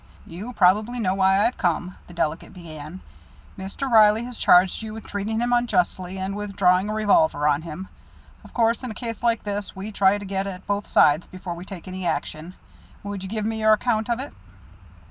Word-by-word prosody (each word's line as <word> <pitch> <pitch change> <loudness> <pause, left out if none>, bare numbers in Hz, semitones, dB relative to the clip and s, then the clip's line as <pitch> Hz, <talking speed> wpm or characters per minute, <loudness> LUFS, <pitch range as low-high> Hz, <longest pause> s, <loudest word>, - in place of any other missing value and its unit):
"You 205 +9 -8
probably 215 +5 +3
know 190 -5 +1
why 195 +1 +3
I've 240 - -1
come," 180 0 -1
the 175 - -12
delegate 165 +3 -2
began. 160 0 -9 0.5
"Mr. 195 +8 -5
Reilly 220 -1 +5
has 250 0 -7
charged 180 +3 +5
you 220 -1 -6
with 225 - -9
treating 210 +2 -3
him 240 +1 0
unjustly 190 -5 0
and 190 +1 -3
with 205 -1 -6
drawing 185 +1 +3
a - - -2
revolver 215 - +3
on 145 0 +2
him. 170 +3 -7 0.6
Of - - -15
course, 230 -1 +1
in 250 - -4
a 220 - -7
case 230 -3 -5
like 230 -1 +1
this, 205 -1 -4
we 195 +3 -6
try 200 -1 +3
to 205 - -8
get 195 0 -2
at 190 -1 -7
both 205 0 -2
sides 150 +3 +4
before 185 -1 -7
we 170 +2 -9
take 190 -2 -9
any 185 0 -6
action. 160 +3 -4 0.5
Would 200 -1 -5
you 190 - -6
give 215 0 -3
me 220 0 -2
your 215 0 +5
account 220 0 0
of 235 0 0
it?" 275 +2 -5
200 Hz, 205 wpm, -24 LUFS, 185-220 Hz, 0.6 s, Reilly